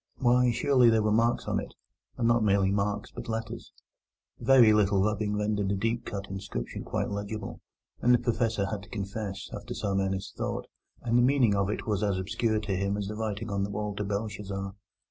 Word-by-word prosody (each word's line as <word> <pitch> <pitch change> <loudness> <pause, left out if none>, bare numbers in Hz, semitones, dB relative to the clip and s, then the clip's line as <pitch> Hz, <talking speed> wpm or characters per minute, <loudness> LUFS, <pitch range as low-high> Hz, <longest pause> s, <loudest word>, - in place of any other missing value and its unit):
Why, 125 0 +4
surely 125 0 +4
there 110 -1 +3
were 105 - +2
marks 115 +2 +2
on - - +1
it, - - -8 0.4
and 115 - +1
not 120 -1 +3
merely 100 -2 +3
marks, 100 0 -1
but - - -8
letters! 110 -1 -4 0.7
A - - -12
very 125 -4 +7
little 100 -2 +3
rubbing 105 0 0
rendered 105 -1 0
the 100 - +1
deeply 115 +4 -2
cut 100 -1 -4
inscription 95 +1 -5
quite - - -2
legible, 100 0 -5 0.4
but 125 - +3
the 125 - +7
Professor 115 -3 0
had 100 0 -4
to - - -14
confess, 100 -1 -5
after - - -6
some 100 -1 -1
earnest 95 0 -2
thought, - - -3 0.4
that 115 - 0
the 120 - +6
meaning 125 -4 +4
of 100 0 +1
it 105 - -3
was 105 -3 0
as 100 -3 +1
obscure 110 +4 0
to 105 -3 -2
him 100 +2 0
as 100 -1 -3
the 105 - -4
writing 110 0 -3
on 100 0 0
the 100 - -2
wall 105 0 -3
to 105 - -2
Belshazzar. 100 -1 -4
105 Hz, 205 wpm, -28 LUFS, 100-115 Hz, 0.7 s, very